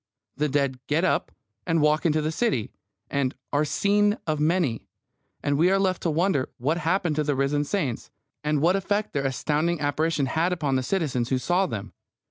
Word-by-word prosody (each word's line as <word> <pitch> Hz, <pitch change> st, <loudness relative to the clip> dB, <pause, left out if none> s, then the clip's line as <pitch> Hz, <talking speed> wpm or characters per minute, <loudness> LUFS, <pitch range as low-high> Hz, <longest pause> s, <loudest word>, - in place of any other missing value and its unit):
The 150 Hz, +2 st, 0 dB
dead 140 Hz, -2 st, 0 dB
get 155 Hz, +4 st, +1 dB
up -, -, 0 dB, 0.4 s
and 165 Hz, -1 st, +2 dB
walk 150 Hz, +2 st, +3 dB
into 155 Hz, -1 st, +1 dB
the 155 Hz, -, 0 dB
city, 160 Hz, -, 0 dB, 0.4 s
and 140 Hz, -2 st, 0 dB, 0.2 s
"are 145 Hz, +1 st, +3 dB
seen 205 Hz, +6 st, +2 dB
of 155 Hz, -2 st, -1 dB
many," 155 Hz, -6 st, +1 dB, 0.6 s
and 145 Hz, 0 st, +1 dB
we 175 Hz, +3 st, +5 dB
are 195 Hz, -, +3 dB
left 190 Hz, -2 st, 0 dB
to 170 Hz, -, 0 dB
wonder 160 Hz, -4 st, +1 dB
what 155 Hz, +7 st, 0 dB
happened 175 Hz, -1 st, 0 dB
to 155 Hz, -, +2 dB
the 145 Hz, -1 st, 0 dB
risen 140 Hz, +2 st, +1 dB
saints, 145 Hz, -, -2 dB, 0.3 s
and 150 Hz, -1 st, 0 dB
what 175 Hz, +3 st, +4 dB
effect 205 Hz, +2 st, -1 dB
their 140 Hz, -1 st, 0 dB
astounding 155 Hz, +5 st, 0 dB
apparition 150 Hz, +1 st, 0 dB
had 160 Hz, +7 st, +1 dB
upon 150 Hz, -6 st, -1 dB
the 130 Hz, -, +2 dB
citizens 130 Hz, -6 st, -1 dB
who 130 Hz, -, +2 dB
saw 175 Hz, +9 st, +1 dB
them. 105 Hz, -, -6 dB
155 Hz, 190 wpm, -25 LUFS, 140-175 Hz, 0.6 s, we